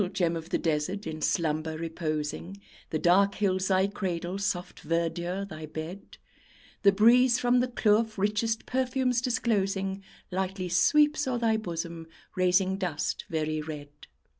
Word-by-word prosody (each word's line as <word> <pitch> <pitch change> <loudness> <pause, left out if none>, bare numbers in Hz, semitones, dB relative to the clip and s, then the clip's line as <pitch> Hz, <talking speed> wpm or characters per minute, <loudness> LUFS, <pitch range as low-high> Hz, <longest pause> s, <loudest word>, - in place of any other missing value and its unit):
"Gem 170 -2 +1
of 165 0 -6
the - - +1
Desert," 165 +5 -1
in 155 -1 -5
slumber 155 -1 0
reposing, 165 +2 -4 0.3
The 155 - -1
dark 195 +5 +4
hills 190 -2 0
thy 190 0 +3
cradle, 185 -2 -3
soft 190 -3 -3
verdure 170 +4 -2
thy 155 -3 -8
bed; 160 +5 -8 0.6
The 200 - +6
breeze 235 +5 +5
from 245 0 +3
the 250 - +1
kloof 220 -2 +2
richest 210 +3 0
perfumes 255 -1 0
disclosing, 195 -6 0 0.3
Lightly 185 0 -2
sweeps 295 - +3
o'er 250 -2 0
thy 230 -2 +2
bosom, 170 -5 -4 0.3
raising 185 +1 +2
dust 175 -6 -2
very 155 -1 -1
red. 150 -2 -7
190 Hz, 140 wpm, -28 LUFS, 165-215 Hz, 0.6 s, The